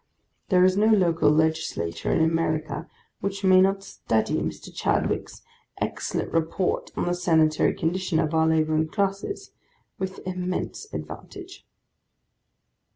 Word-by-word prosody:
There 180 Hz, -3 st, +5 dB
is 185 Hz, +1 st, +4 dB
no 215 Hz, +1 st, +4 dB
local 170 Hz, -8 st, +4 dB
Legislature 150 Hz, -, 0 dB
in 160 Hz, -, +3 dB
America 160 Hz, 0 st, -1 dB, 0.3 s
which 195 Hz, 0 st, -4 dB
may 185 Hz, -1 st, +6 dB
not 195 Hz, +1 st, +2 dB
study 110 Hz, -, -1 dB
Mr. -, -, -5 dB
Chadwick's -, -, -1 dB, 0.4 s
excellent -, -, -2 dB
Report 165 Hz, +3 st, 0 dB
upon -, -, -3 dB
the 175 Hz, -, +1 dB
Sanitary 160 Hz, -3 st, +2 dB
Condition 180 Hz, +1 st, -1 dB
of 155 Hz, 0 st, 0 dB
our 160 Hz, 0 st, +3 dB
Labouring 155 Hz, 0 st, +2 dB
Classes, 200 Hz, -, -2 dB, 0.5 s
with 190 Hz, +1 st, -5 dB
immense 185 Hz, -, -4 dB
advantage. 380 Hz, 0 st, -9 dB
175 Hz, 120 wpm, -25 LUFS, 160-195 Hz, 0.5 s, may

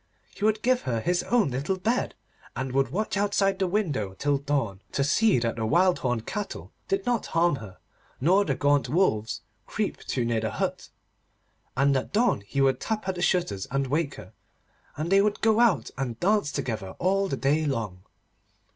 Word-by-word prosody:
He -, -, -8 dB
would 215 Hz, 0 st, +2 dB
give 255 Hz, 0 st, +3 dB
her 115 Hz, -2 st, 0 dB
his 175 Hz, +8 st, +1 dB
own 225 Hz, -, +2 dB
little 140 Hz, +9 st, -1 dB
bed, 225 Hz, +7 st, -1 dB, 0.4 s
and 130 Hz, 0 st, -3 dB
would 135 Hz, 0 st, +1 dB
watch 205 Hz, -, -2 dB
outside 200 Hz, -1 st, +1 dB
the 190 Hz, -, +1 dB
window 150 Hz, -, -1 dB
till 145 Hz, -1 st, +1 dB
dawn, 135 Hz, -9 st, -1 dB
to 140 Hz, -, +1 dB
see 205 Hz, -, +3 dB
that 115 Hz, -1 st, -1 dB
the 110 Hz, -, -1 dB
wild 180 Hz, +6 st, +3 dB
horned 120 Hz, -3 st, -1 dB
cattle 205 Hz, -1 st, -5 dB, 0.2 s
did 390 Hz, -5 st, -1 dB
not 245 Hz, -2 st, 0 dB
harm 165 Hz, -3 st, +2 dB
her, 105 Hz, -6 st, -10 dB, 0.4 s
nor 185 Hz, +9 st, +4 dB
the 140 Hz, -9 st, -1 dB
gaunt 145 Hz, +1 st, +2 dB
wolves 110 Hz, -, +1 dB, 0.3 s
creep -, -, -2 dB
too 125 Hz, -, -2 dB
near 115 Hz, -1 st, 0 dB
the 110 Hz, -, -1 dB
hut. -, -, -3 dB, 0.9 s
And 140 Hz, +1 st, +3 dB
at 130 Hz, -, -2 dB
dawn 225 Hz, -, +2 dB
he 140 Hz, +5 st, -1 dB
would 135 Hz, -1 st, +3 dB
tap 215 Hz, -3 st, -3 dB
at 190 Hz, -, 0 dB
the 175 Hz, -, -6 dB
shutters 170 Hz, -, 0 dB
and 140 Hz, +1 st, 0 dB
wake 145 Hz, +3 st, -1 dB
her, -, -, -12 dB, 0.6 s
and 155 Hz, +4 st, -3 dB
they 195 Hz, 0 st, +6 dB
would 210 Hz, 0 st, +1 dB
go 220 Hz, 0 st, +3 dB
out 190 Hz, -, +3 dB
and 120 Hz, -4 st, -3 dB
dance 205 Hz, -5 st, +2 dB
together 110 Hz, -9 st, -4 dB
all 195 Hz, +2 st, +1 dB
the 135 Hz, -, -2 dB
day 150 Hz, +4 st, +1 dB
long. 110 Hz, -9 st, -3 dB
145 Hz, 190 wpm, -26 LUFS, 125-195 Hz, 0.9 s, they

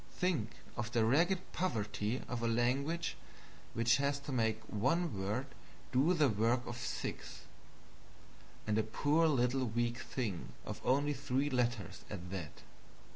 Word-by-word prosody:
Think 160 Hz, -, 0 dB, 0.2 s
of 120 Hz, 0 st, -3 dB
the 115 Hz, -2 st, +3 dB
ragged 175 Hz, +10 st, +2 dB
poverty 110 Hz, -, -1 dB
of 125 Hz, -2 st, -3 dB
a 115 Hz, -, +1 dB
language 135 Hz, +8 st, +1 dB, 0.6 s
which 115 Hz, +1 st, +4 dB
has 140 Hz, 0 st, +1 dB
to 145 Hz, -, -6 dB
make 110 Hz, -4 st, +1 dB
one 130 Hz, -, 0 dB
word 105 Hz, +7 st, -1 dB, 0.5 s
do 145 Hz, +8 st, +4 dB
the 155 Hz, -3 st, +5 dB
work 115 Hz, +2 st, +2 dB
of 120 Hz, -, -5 dB
six 125 Hz, -, -4 dB, 1.2 s
and 105 Hz, 0 st, +2 dB
a -, -, +3 dB
poor 150 Hz, +9 st, +2 dB
little 130 Hz, -2 st, +2 dB
weak 120 Hz, +1 st, 0 dB
thing 110 Hz, -10 st, -3 dB
of -, -, -5 dB
only 145 Hz, +3 st, +3 dB
three 140 Hz, +1 st, 0 dB
letters 120 Hz, -6 st, -1 dB
at 90 Hz, -3 st, -6 dB
that. 90 Hz, -6 st, -6 dB
120 Hz, 140 wpm, -35 LUFS, 110-140 Hz, 1.2 s, the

